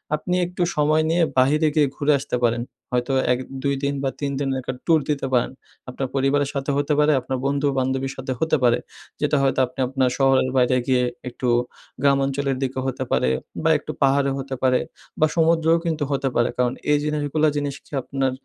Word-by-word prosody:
আপনি 180 +4 -2
একটু 180 +1 -6
সময় 155 +1 +3
নিয়ে, 170 +1 +3
বাহিরে 150 +5 +4
গিয়ে 150 -2 +4
ঘুরে 145 +1 +1
আসতে 140 -2 -3
পারেন। 120 0 +2 0.3
হয়তো, 125 +2 0 0.2
১, 125 - -2 0.2
২ 140 -1 +1
দিন 140 0 +1
বা 135 - +1
৩ 140 -1 -2
দিনের 135 -2 -1
একটা 130 - -4
ট্যুর 160 -2 +4
দিতে 140 -2 0
পারেন। 125 - +2 0.4
আপনার 130 +1 -3
পরিবারের 140 +1 +1
সাথে 140 0 -2
হতে 145 +1 +1
পারে, 150 +1 +4
আপনার 130 - -3
বন্ধু, 140 +1 +1
বান্ধবীর 130 +1 -1
সাথে 130 0 -4
হতে 160 -1 +2
পারে। 120 -1 +4 0.4
যেটা 150 - +2
হয়তো 135 0 +1
আপনি, 125 +2 -14
আপনার 130 -1 +1
শহরের 135 -1 +3
বাইরে 125 0 +3
গিয়ে, 125 -1 +3 0.3
একটু 125 +1 -4 0.5
গ্রামাঞ্চলের 140 -1 +1
দিকও 130 0 -2
হতে 130 0 -2
পারে - - +2 0.3
বা - - +3
একটু - - -6
পাহাড়েও 135 0 +3
হতে 135 0 -4
পারে 130 -1 +4 0.4
বা 155 - +5
সমুদ্রেও 165 0 +3
কিন্তু 155 -3 -1
হতে 135 -1 0
পারে 120 +1 +2
কারণ 125 0 +1 0.2
এই 150 - +5
জিনিসগুলা, 150 0 0
জিনিস 145 -1 -2 0.3
আপনার 135 -1 -1
135 Hz, 190 wpm, -22 LUFS, 130-150 Hz, 0.5 s, বা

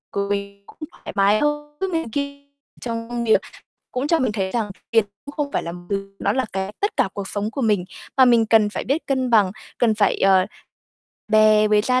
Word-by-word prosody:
cũng 200 0 -4
thoải - - -10
mái 200 +2 +4
hơn 295 0 -2
trước 385 -1 -2
này 325 -1 0
ki 280 +1 -4 0.3
trong 230 -1 -4
công 240 0 -3
việc 220 - +4 0.5
cũng 255 +3 -1
cho 330 +1 +3
mình 255 -7 0
thấy 190 -3 -2
rằng 225 -4 -1 0.2
tiền 225 -2 +4 0.2
cũng 285 - -9
không 290 -2 -2
phải - - 0
làm 175 +1 -7
từ 195 0 -4
nó - - +1
là 260 0 0
cái 190 +1 -3
tất 410 +3 -1
cả - - +2
cuộc 200 -1 -4
sống 205 +1 -2
của 270 - -4
mình. 210 -5 +2 0.3
Mà 265 - +7
mình 235 -3 +4
cần 220 -1 +4
phải - - -4
biết 285 +6 -1
cân 260 -2 0
bằng, 205 -5 +4 0.3
cần 230 -3 +3
phải, 210 -1 +2
ờ, 190 -1 +4 0.8
bè 215 0 +5
với 210 0 +4
gia 255 +3 +2
225 Hz, 215 wpm, -22 LUFS, 200-265 Hz, 0.8 s, Mà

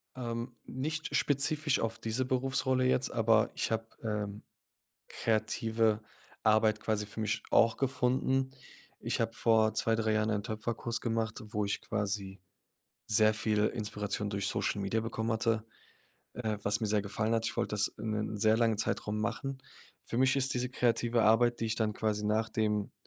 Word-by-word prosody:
Ähm, 120 -1 -4
nicht 155 +5 -3
spezifisch 145 +1 +1
auf 115 0 -2
diese 115 +3 -2
Berufsrolle 130 0 +1
jetzt, 130 +1 +1
aber 115 -1 +3
ich - - -1
habe, 110 0 0 0.2
ähm, 105 -2 -3 0.7
kreative 110 0 +1 0.4
Arbeit 110 0 +3
quasi 105 -1 -1
für 110 - -7
mich 105 0 -1
auch 115 0 +5
gefunden. 130 0 +1 0.5
Ich - - -2
habe - - 0
vor 110 -1 +3
2, 115 - +1
3 110 -1 +1
Jahren 110 +1 +1
einen 105 -1 0
Töpferkurs 115 +2 -3
gemacht, 115 -1 -2
wo 105 -1 -1
ich 100 - -2
quasi 100 -2 -3 0.7
sehr 110 0 +4
viel 105 -1 +1
Inspiration 105 -2 -3
durch 100 0 -2
Social 100 - -1
Media 105 +3 0
bekommen 110 0 -2
hatte, 110 0 0 0.7
äh, 110 -3 -2
was 100 +3 +1
mir 110 - 0
sehr 105 0 +1
gefallen 110 +3 -1
hat. 115 0 0
Ich - - -3
wollt - - -1
das 105 0 +2
in 110 +1 -6
'nen 105 0 -2
sehr 110 +1 +4
langen 115 -2 +2
Zeitraum 105 -1 -1
machen. 115 +5 -2 0.5
Für 115 - -4
mich 130 +1 +4
ist 135 0 +1
diese 125 0 -1
kreative 120 -2 +2
Arbeit, 120 +2 +4
die 115 - 0
ich 110 - 0
dann 110 -2 0
quasi 105 -1 -1
nachdem 105 -1 0
110 Hz, 165 wpm, -31 LUFS, 105-120 Hz, 0.7 s, auch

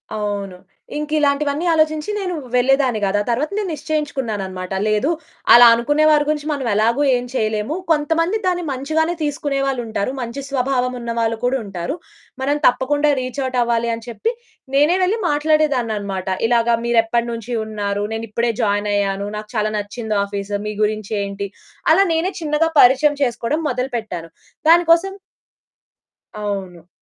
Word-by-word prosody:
అవును. 200 -3 -3 0.4
ఇంకిలాంటివన్నీ 300 0 0
ఆలోచించి 310 +1 +1
నేను 370 -3 -2 0.2
వెళ్ళేదాన్ని 255 -2 +3
కాదు. 195 +1 +1
ఆ - - -4
తరువాత 260 +8 0
నేను 415 -3 -1
నిశ్చయించుకున్నాననమాట, 220 - -3
లేదు 215 +8 +1 0.4
అలా 240 0 +10
అనుకునే 290 +7 +1
వారి 300 -1 +4
గురించి 300 0 -1
మనం 280 -3 -2
ఎలాగో 230 +7 +2
ఏం 245 - -4
చేయలేము, 215 +3 -1 0.2
కొంతమంది 325 +6 +1
దాన్ని 355 -1 0
మంచిగానే 315 +6 0
తీసుకునే 290 -2 -1
వాళ్ళుంటారు, 235 -4 -2
మంచి 240 +3 -5
స్వభావం 255 -1 0
ఉన్న 235 0 -4
వాళ్ళు 225 0 0
కూడా 260 +2 +2
ఉంటారు, 195 - -4 0.5
మనం 285 +2 +1
తప్పకుండా 290 +4 +2
రీచ్ 255 +2 -5
ఔట్ 255 -1 -2
అవ్వాలి 235 0 +1
అని 230 0 -6
చెప్పి, 445 - -2 0.4
నేనే 300 +6 +4
వెళ్లి 405 +5 +1
మాట్లాడేదాననమాట. 250 -11 0 0.2
ఇలాగ, 235 0 +2 0.2
మీరెప్పటి 235 0 +2
నుంచి 230 +1 -6
ఉన్నారు, 205 -1 -3
నేను 225 0 -3
ఇప్పుడే 235 +2 0
జాయిన్ 205 -1 0
అయ్యాను, 200 0 -1
నాకు 210 0 -8
చాలా 215 0 0
నచ్చింది 215 +1 -4
ఆఫీసు, 200 0 -4
మీ 210 - -3
గురించి 215 -1 -2
ఏంటి, 200 0 -4 0.4
అలా 390 +5 +5
నేనే 350 +4 0
చిన్నగా 310 +1 +1
పరిచయం 280 +4 +5
చేసుకోవడం 245 +4 -1
మొదలుపెట్టాను. 235 -9 -4 0.4
దానికోసం 345 +3 +4 1.3
అవును. 190 -5 -5
245 Hz, 140 wpm, -20 LUFS, 215-295 Hz, 1.3 s, అలా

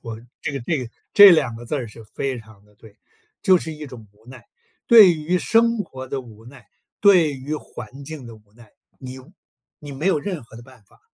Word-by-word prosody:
我 115 -2 -8 0.2
这 - - -3
个 140 - -4
这 150 +5 -2
个 120 -3 -7 0.2
这 205 -1 +10
2 130 -9 +2
个 120 - -10
字 150 - -4
儿 130 -5 -3
是 110 +1 -14
非 130 +4 -4
常 110 -2 -17
地 105 0 -27
对， 105 0 -19 0.4
就 190 -4 +5
是 160 - -7
一 150 0 -9
种 120 -5 -12
无 110 +3 -29
奈， 130 0 -13 0.4
对 210 -8 +8
于 165 +4 -1
生 230 +2 +2
活 130 -9 -7
的 135 0 -4
无 110 -2 -16
奈、 125 0 -15 0.3
对 180 -7 +5
于 135 +3 -5
环 130 -1 -10
境 145 -4 -9
的 115 - -11
无 105 -1 -26
奈， 115 -3 -19 0.3
你 130 0 -9 0.6
你 145 -2 -10
没 150 +7 -4
有 190 - +2
任 175 -2 -5
何 115 -1 -16
的 120 - -11
办 130 -2 -18
法， - - -27
130 Hz, 230 characters per minute, -21 LUFS, 115-160 Hz, 0.6 s, 这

